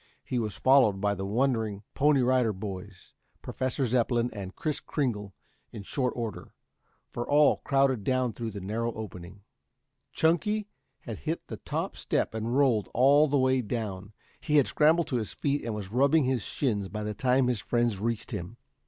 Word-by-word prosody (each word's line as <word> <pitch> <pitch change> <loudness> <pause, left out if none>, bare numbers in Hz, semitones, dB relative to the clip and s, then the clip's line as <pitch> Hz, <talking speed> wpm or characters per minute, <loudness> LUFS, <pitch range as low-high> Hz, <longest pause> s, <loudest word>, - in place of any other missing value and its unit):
He 125 - -2
was 105 -6 -3
followed 130 -7 +4
by 100 0 +1
the 95 -1 -4
wondering 110 -3 0
Pony 140 -2 +3
Rider 125 -3 +2
Boys, 95 -1 -8 0.3
Professor 130 +1 -2
Zepplin 120 0 +1
and 95 -3 -7
Kris 155 -2 -2
Kringle 105 - -3 0.4
in 105 -3 -8
short 125 +4 -1
order, 115 -4 -5 0.6
for 120 - -5
all 145 0 +5
crowded 135 -5 +1
down 130 0 0
through 115 0 -4
the 100 -2 -7
narrow 115 +5 -2
opening. 95 -2 -9 0.7
Chunky 205 +6 +1 0.3
had - - -7
hit - - -3
the - - -7
top - - -4
step - - -1
and 115 +3 -2
rolled 125 -8 +2
all 140 +5 +5
the 145 0 +1
way 130 -1 +3
down. 105 -3 -5 0.3
He 150 - -1
had 145 -3 +6
scrambled 160 +2 +3
to 125 - 0
his 110 -3 -4
feet 145 0 -1
and 115 -2 -3
was 100 -2 -6
rubbing 140 +6 +4
his 130 -2 0
shins 105 -8 -2
by 105 0 -5
the 105 0 -3
time 125 +4 +2
his 125 -3 0
friends 120 -2 0
reached 115 +1 -2
him. 90 +7 -6
120 Hz, 175 wpm, -28 LUFS, 105-135 Hz, 0.7 s, had